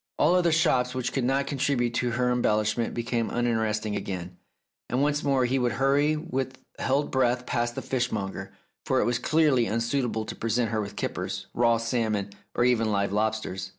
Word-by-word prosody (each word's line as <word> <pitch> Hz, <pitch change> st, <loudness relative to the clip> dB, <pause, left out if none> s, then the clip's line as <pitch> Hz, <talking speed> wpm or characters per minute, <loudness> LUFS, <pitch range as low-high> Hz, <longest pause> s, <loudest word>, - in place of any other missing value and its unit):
All 160 Hz, +4 st, +4 dB
other 175 Hz, -2 st, +3 dB
shops 130 Hz, -6 st, +2 dB
which 130 Hz, -1 st, -2 dB
could 135 Hz, -, 0 dB
not 135 Hz, +2 st, +1 dB
contribute 135 Hz, -4 st, 0 dB
to 125 Hz, -, 0 dB
her 125 Hz, +1 st, +1 dB
em 125 Hz, 0 st, +1 dB
bellishment 110 Hz, +2 st, +1 dB
became 115 Hz, -1 st, -1 dB
uninteresting 110 Hz, -3 st, 0 dB
again, 90 Hz, -2 st, -5 dB, 0.5 s
and 125 Hz, -, 0 dB
once 150 Hz, 0 st, +1 dB
more 135 Hz, -3 st, +2 dB
he 130 Hz, +2 st, +1 dB
would 120 Hz, -2 st, +1 dB
hurry 140 Hz, +4 st, +2 dB
with 135 Hz, -5 st, -3 dB, 0.2 s
held 140 Hz, +3 st, 0 dB
breath 125 Hz, -1 st, +1 dB
past 120 Hz, -2 st, -1 dB
the -, -, -4 dB
fish 125 Hz, -2 st, -1 dB
monger, 95 Hz, -3 st, -4 dB, 0.3 s
for -, -, +1 dB
it -, -, +2 dB
was 120 Hz, 0 st, 0 dB
clearly 150 Hz, -7 st, +3 dB
unsuitable 115 Hz, 0 st, -1 dB
to -, -, -6 dB
present 115 Hz, 0 st, 0 dB
her 110 Hz, -1 st, 0 dB
with 100 Hz, -1 st, -6 dB
kippers, -, -, -3 dB
raw 115 Hz, -1 st, +3 dB
salmon, 110 Hz, -4 st, -1 dB, 0.2 s
or 120 Hz, -, +3 dB
even 115 Hz, -3 st, +2 dB
live 100 Hz, -1 st, 0 dB
lobsters. 105 Hz, -3 st, -1 dB
120 Hz, 185 wpm, -27 LUFS, 110-130 Hz, 0.5 s, All